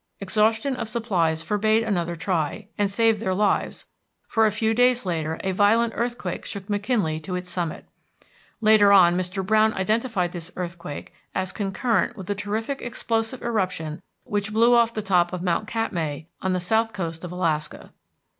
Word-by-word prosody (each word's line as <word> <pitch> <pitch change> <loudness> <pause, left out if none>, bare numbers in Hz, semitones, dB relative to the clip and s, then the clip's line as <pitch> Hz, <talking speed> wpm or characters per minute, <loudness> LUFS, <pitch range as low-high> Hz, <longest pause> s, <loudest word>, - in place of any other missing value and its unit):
Exhaustion 220 +6 +1
of 230 -3 -4
supplies 180 -9 0
forbade 215 +3 +2
another 175 -6 -1
try, 175 +3 -2
and 205 -2 +1
saved 225 +1 +2
their 190 -4 0
lives, 205 +1 0 0.4
for 220 -1 +3
a - - +1
few 220 +2 0
days 245 -1 +3
later 160 -3 -2
a 190 - 0
violent 220 +4 +3
earthquake 240 +1 -3
shook 200 -2 -6
McKinley 205 -6 0
to 180 +4 -5
its 180 0 -4
summit. 175 -3 -3 0.8
Later 215 -2 +6
on 175 -3 +7
Mr. 185 +1 -2
Browne 220 +2 +3
identified 215 -2 0
this 175 -1 -8
earthquake 170 -3 -6 0.2
as 185 0 -1
concurrent 215 +3 0
with 190 - -7
the 205 - -1
terrific 215 +7 -3
explosive 230 0 -2
eruption 185 -8 -2 0.2
which 205 0 -2
blew 230 +3 +4
off 235 -1 +4
the 215 -2 -4
top 180 -3 +2
of 180 -1 -4
Mount 180 +3 0
Katmai, 170 -11 -2 0.2
on 190 0 0
the 185 - 0
south 220 +5 +1
coast 165 -4 -4
of 180 - -6
Alaska. 165 -4 -2
200 Hz, 165 wpm, -24 LUFS, 180-225 Hz, 0.8 s, on